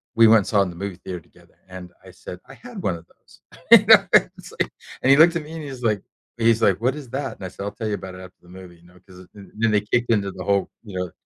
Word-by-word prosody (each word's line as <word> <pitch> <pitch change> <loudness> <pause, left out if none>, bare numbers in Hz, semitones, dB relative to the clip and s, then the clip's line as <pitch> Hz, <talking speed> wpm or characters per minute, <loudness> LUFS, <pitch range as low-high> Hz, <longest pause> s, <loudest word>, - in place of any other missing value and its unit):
we 115 0 +6
went 110 0 +6
and 100 - -5
saw 100 - +2
in 95 - -4
the 85 - -10
movie 100 +1 -6
theater 90 -1 -7
together, - - -25
and 90 -1 -10
I 95 - -13
said, 90 0 -11
"I - - -13
had 240 -5 -10
one 90 - -1
of 85 0 -13
those." - - -25 0.3
You - - +9
know, - - +7
it's - - +2
like - - -1 0.3
and 130 - +1
he 140 - +6
looked 165 +3 +6
at 160 - -6
me 150 - -12
and 160 -1 -7
he's 135 -4 -9
like 105 -4 0 0.4
he's 115 -1 +2
like, 100 +1 +2
"What 130 +4 0
is 145 -5 -10
that?" 135 0 -4
And 95 - -9
I - - -5
said, 95 - -9
"I'll 100 - -4
tell 110 0 -6
you 105 - -2
about 95 -2 -9
it 90 - -11
after 90 0 -13
the 90 - -21
movie," 90 -1 -13
you 85 - -25
know? 90 +1 -21
'Cause 90 -1 -15
th 100 -1 -13
then 110 +1 +1
they 105 -1 +2
kicked 120 +3 -1
into 100 -3 0
the 95 0 -8
whole, 100 0 0
you 100 -5 -9
know 90 -2 -4
100 Hz, 305 wpm, -22 LUFS, 90-115 Hz, 0.4 s, You